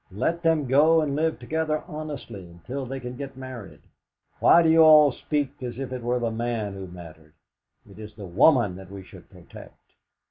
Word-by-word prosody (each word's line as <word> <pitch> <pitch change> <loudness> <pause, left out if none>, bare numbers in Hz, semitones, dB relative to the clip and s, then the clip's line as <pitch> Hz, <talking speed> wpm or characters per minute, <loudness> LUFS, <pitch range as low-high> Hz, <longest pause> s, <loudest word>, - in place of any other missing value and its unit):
Let 165 - -2
them 165 -3 +1
go 155 +5 +4
and 145 -3 -2
live 160 +2 0
together 155 +4 -2
honestly 150 -9 -7
until 105 +11 -8
they 135 +2 -5
can 125 -1 -7
be 140 +2 -6
married. 130 -5 -10 0.6
Why 170 - +6
do 160 - +3
you 165 - +4
all 155 -2 +7
speak 145 +1 -3
as 125 -2 -6
if 135 -1 -5
it 125 - -5
were 120 +1 -1
the 120 -2 -2
man 115 -3 -3
who 95 -1 -8
mattered? 80 -3 -13 0.5
It - - -15
is 105 -1 -10
the 105 - -9
woman 105 - +3
that 95 -1 -12
we 100 -1 -9
should - - -16
protect!" - - -14
130 Hz, 190 wpm, -24 LUFS, 105-150 Hz, 0.6 s, all